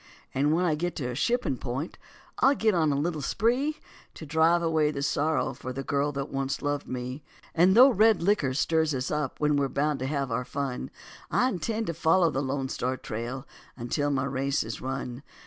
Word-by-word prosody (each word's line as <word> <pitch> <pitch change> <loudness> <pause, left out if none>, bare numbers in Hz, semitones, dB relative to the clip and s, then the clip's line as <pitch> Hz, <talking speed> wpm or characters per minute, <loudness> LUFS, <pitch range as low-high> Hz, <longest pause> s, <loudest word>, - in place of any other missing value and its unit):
And 145 +3 +2
when 175 +3 +2
I 165 - +2
get 175 +3 -2
to 125 -4 -3
a - - -5
shipping 235 - 0
point, 135 +6 -4 0.4
I'll 275 +1 +5
get 220 -4 +2
on 160 -4 +2
a - - +1
little 155 +2 -1
spree 250 - 0 0.4
To 160 - -8
drive 160 +3 +3
away 160 -2 +2
the 140 -2 -3
sorrow 150 0 0
for 130 +1 -7
the 135 +2 -5
girl 140 +2 0
that 140 0 -4
once 135 0 -2
loved 145 -1 -2
me. 125 +2 -5 0.3
And 180 +5 +4
though 260 +3 +9
red 220 -2 +4
licker 170 -8 +1
stirs 160 0 +1
us 130 0 -2
up 150 -3 -2
we're 145 -2 +2
bound 145 +2 0
to 130 - -2
have 140 -3 -2
our 120 +2 0
fun, 135 -1 -4 0.4
And - - +1
I 250 - +3
intend 220 +3 -2
to 170 - -2
follow 165 +2 +3
the 135 - -1
Lone 135 0 -2
Star 130 0 -2
Trail 120 +5 -5 0.3
until 130 +4 -1
my 140 -1 0
race 135 +1 0
is 110 -1 -6
run. 130 -1 -4
145 Hz, 205 wpm, -27 LUFS, 135-170 Hz, 0.4 s, though